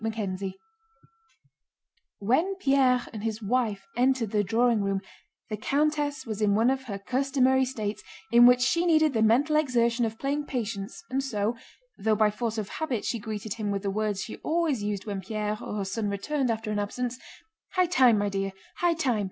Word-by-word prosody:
CHAPTER 220 -4 -2
XIII 190 0 -5 1.6
When 315 - +1
Pierre 270 -7 +3
and 215 -2 -6
his 220 -1 -2
wife 215 -2 0
entered 250 -3 +2
the 210 -1 +2
drawing 230 +2 +2
room 195 -1 -1 0.5
the 215 - -2
countess 290 +3 0
was 215 -2 -5
in 205 -1 +3
one 230 +4 +4
of 265 0 -3
her 200 -5 -4
customary 265 +4 +2
states 215 -5 -4 0.3
in 240 +1 +8
which 250 0 +5
she 335 +7 +2
needed 315 -3 +4
the 225 - +1
mental 265 +8 +4
exertion 240 -5 +2
of 225 -1 -2
playing 290 +3 -2
patience, 230 - -4
and 270 +1 0
so—though 225 - -3
by 210 0 +3
force 225 +1 -3
of 210 -3 -3
habit 265 -9 -3
she 235 - -1
greeted 215 -1 -5
him 215 -2 -3
with 200 0 -2
the 200 - -1
words 210 -1 -1
she 225 - -7
always 315 -7 0
used 205 -2 -3
when 200 -3 -4
Pierre 210 +2 -3
or - - -5
her 200 -2 -2
son 205 +2 -2
returned 255 +7 -1
after 220 -1 -2
an 210 - -1
absence: 245 +4 -3 0.5
"High 365 -1 +3
time, 260 -10 +5
my 205 0 0
dear, 195 -1 -2 0.2
high 345 -1 +2
time! 260 -9 +1
230 Hz, 185 wpm, -27 LUFS, 210-265 Hz, 1.6 s, in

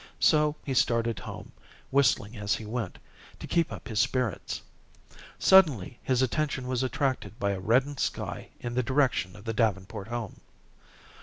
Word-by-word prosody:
So 150 -1 +4
he 135 - -1
started 115 -3 +2
home, - - -8 0.4
whistling 120 -5 +2
as 105 -1 0
he 110 - -7
went, 110 -3 -4 0.4
to - - -8
keep 170 -1 +1
up - - -8
his 110 -4 -1
spirits. 125 -8 -1 0.7
Suddenly 150 - +5
his 130 -1 +1
attention 135 0 -1
was 130 -1 0
attracted 130 -3 -1
by 100 -5 0
a 95 - -3
reddened 130 +8 +2
sky - - -3
in 120 -1 -4
the 125 - +2
direction 125 -7 +1
of 105 - -13
the 115 - -2
Davenport 105 -2 -1
home. 120 -2 -5
120 Hz, 155 wpm, -28 LUFS, 110-130 Hz, 0.7 s, Suddenly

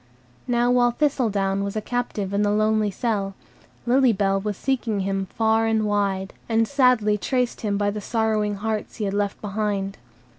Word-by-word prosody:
Now 240 0 +2
while 245 -1 +4
Thistledown 215 -8 0
was 200 +1 -4
a - - +1
captive 210 -4 -3
in 200 - +1
the 205 - +2
lonely 215 0 +2
cell, 200 -2 -2 0.5
Lily 255 +1 +4
Bell 195 -1 +1
was 205 -1 -3
seeking 240 -6 -1
him 195 0 -2
far 225 +1 +1
and 220 -1 +1
wide, 195 -2 -1 0.2
and 225 0 +2
sadly 250 -6 +3
traced 250 +2 -1
him 205 -2 -1
by 205 0 +1
the 210 0 -5
sorrowing 215 -1 0
hearts 215 +1 -3
he 215 - -3
had 195 - -2
left 205 0 -1
behind. 200 -3 -2
210 Hz, 175 wpm, -23 LUFS, 200-230 Hz, 0.5 s, while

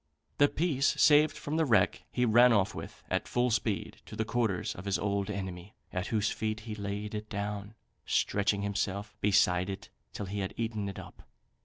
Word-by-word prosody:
The 145 - +7
piece 145 -4 +1
saved 150 0 +5
from 150 +2 -3
the 165 - +3
wreck 105 -7 +2
he 125 - +1
ran 120 +2 +6
off 100 -4 +3
with, - - -8
at - - 0
full 125 0 +1
speed, 110 -2 -1
to - - -8
the 110 +1 -1
quarters 115 -5 0
of 90 - -10
his 100 -1 +1
old 100 0 -1
enemy, 95 -1 -5 0.2
at 90 +2 -2
whose 105 -2 +1
feet 110 0 -2
he 110 0 -6
laid 105 0 -4
it 105 0 -5
down, 105 0 -4 0.3
stretching 100 0 +1
himself 100 0 -2
beside 90 -2 +3
it 95 - -6 0.2
till 105 - -5
he 100 +2 -4
had 95 0 -3
eaten 110 -3 -2
it 100 - -8
up. - - -10
105 Hz, 190 wpm, -30 LUFS, 100-115 Hz, 0.3 s, The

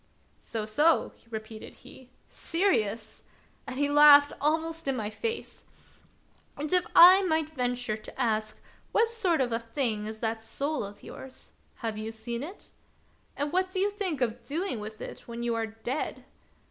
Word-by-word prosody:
" - - -38
So, 220 -2 -5
so," 295 +10 +3 0.2
repeated 220 -1 -8
he, 260 -1 -16
" - - -38
serious! 225 - -1 0.2
" - - -36
and - - -5
he 285 +1 +2
laughed 290 0 +7
almost 320 +1 0
in 270 - +1
my 215 -3 -3
face. 455 - -5 0.5
" - - -36
And 300 +4 -3
if 360 -1 +3
I 370 +3 +10
might 315 -4 0
venture 245 -5 -2
to 215 +4 -12
ask, 215 -3 0 0.4
what 455 +1 +3
sort 380 -10 +1
of 245 -2 0
a 230 - 0
thing 230 -3 -2
is 220 0 -7
that 225 0 -2
soul 280 +5 -2
of 200 0 -10
yours? 265 0 -11 0.3
Have 215 -1 -2
you 215 - -5
ever 225 - -5
seen 235 +2 -4
it? 350 +8 -9 0.7
And 290 +2 -2
what 370 +1 +1
do 370 0 -3
you 405 +2 +2
think 375 - -2
of 235 0 -1
doing 300 - -2
with 215 +1 -8
it - - -9
when 235 0 -6
you 240 -1 0
are 225 -1 -1
dead 225 +6 -5
255 Hz, 185 wpm, -28 LUFS, 225-320 Hz, 0.7 s, I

